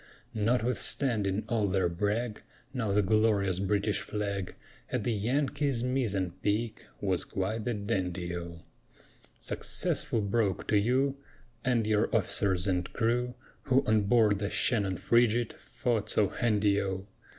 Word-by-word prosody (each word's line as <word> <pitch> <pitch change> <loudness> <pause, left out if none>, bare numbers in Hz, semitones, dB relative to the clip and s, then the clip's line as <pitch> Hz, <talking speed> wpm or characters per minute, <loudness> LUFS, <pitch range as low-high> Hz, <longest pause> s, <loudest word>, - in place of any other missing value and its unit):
Notwithstanding 110 -2 +1
all 110 -3 +1
their 95 -1 +1
brag, 105 +6 -2 0.3
Now 115 -6 -1
the 105 +1 +3
glorious 100 -2 +2
British 100 +1 0
flag 100 -3 -3 0.4
At 125 -4 -1
the 120 - 0
Yankee's 135 +3 0
mizzen 110 -8 0
peak 110 +2 -1
Was 95 -3 0
quite 105 +4 -3
the 120 -2 0
dandy 90 -4 -2
O! 85 -1 -7 0.7
Successful 115 - 0
Broke 100 -2 0
to 105 - +4
you, 130 +6 +1 0.5
And 120 -3 +2
your 105 -1 +2
officers 95 -2 +2
and 90 -2 -1
crew, 125 +1 0 0.3
Who 135 +1 +3
on 110 -1 +3
board 105 -2 +4
the 100 -1 -2
Shannon 100 -7 +1
frigate 120 0 +2
Fought 115 -4 -2
so 100 -3 +2
handy 105 -3 +2
O! 95 -1 -3
105 Hz, 130 wpm, -30 LUFS, 100-120 Hz, 0.7 s, to